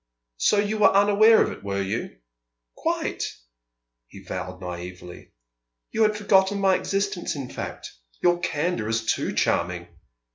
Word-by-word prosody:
"So 210 Hz, -, +3 dB
you 210 Hz, +1 st, 0 dB
were 210 Hz, -, +7 dB
unaware 205 Hz, +3 st, +6 dB
of -, -, -3 dB
it, -, -, -10 dB
were 100 Hz, 0 st, -2 dB
you?" 105 Hz, +5 st, -4 dB, 0.6 s
"Quite!" -, -, -2 dB, 0.8 s
he -, -, -13 dB
vowed 90 Hz, 0 st, -6 dB
naïvely. 90 Hz, -1 st, -8 dB, 0.6 s
"You 225 Hz, -, -1 dB
had 215 Hz, -1 st, +3 dB
forgotten 200 Hz, -1 st, +3 dB
my 195 Hz, -1 st, +4 dB
existence, 195 Hz, -3 st, -2 dB
in 135 Hz, -3 st, -6 dB
fact? -, -, -6 dB, 0.3 s
Your 175 Hz, 0 st, +3 dB
candour 150 Hz, -8 st, -1 dB
is 115 Hz, 0 st, -1 dB
too -, -, 0 dB
charming!" 85 Hz, 0 st, 0 dB
175 Hz, 140 wpm, -25 LUFS, -, 0.8 s, were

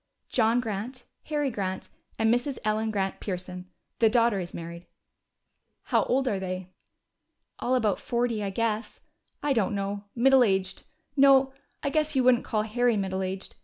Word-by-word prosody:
"John 230 Hz, 0 st, +3 dB
Grant, 225 Hz, +3 st, -5 dB, 0.2 s
Harry 295 Hz, -3 st, -1 dB
Grant, 190 Hz, -3 st, -3 dB, 0.3 s
and 225 Hz, +1 st, +3 dB
Mrs. 250 Hz, +2 st, -1 dB
Ellen 215 Hz, +1 st, +1 dB
Grant 195 Hz, -3 st, -2 dB
Pearson. 180 Hz, -1 st, -6 dB, 0.3 s
The 225 Hz, -, +5 dB
daughter 230 Hz, -3 st, +3 dB
is 175 Hz, -1 st, -5 dB
married." 170 Hz, +1 st, -8 dB, 1.0 s
"How -, -, +2 dB
old 265 Hz, +1 st, +1 dB
are 205 Hz, -6 st, 0 dB
they?" 185 Hz, -1 st, -5 dB, 0.9 s
"All 255 Hz, -, +1 dB
about 215 Hz, -6 st, +1 dB
forty, 235 Hz, -3 st, -1 dB
I 200 Hz, -, -1 dB
guess. 220 Hz, +2 st, -2 dB, 0.4 s
I 290 Hz, -1 st, +2 dB
don't 210 Hz, -4 st, +1 dB
know. 200 Hz, +1 st, -3 dB
Middle 260 Hz, +1 st, +5 dB
aged 190 Hz, -3 st, -1 dB, 0.3 s
no, 270 Hz, -1 st, +5 dB, 0.3 s
I 280 Hz, -, 0 dB
guess 305 Hz, 0 st, 0 dB
you 260 Hz, -, +3 dB
wouldn't 245 Hz, -1 st, +4 dB
call 215 Hz, -2 st, 0 dB
Harry 235 Hz, +1 st, +1 dB
middle 190 Hz, -1 st, -2 dB
aged. 190 Hz, +1 st, -4 dB
220 Hz, 160 wpm, -27 LUFS, 195-250 Hz, 1.0 s, The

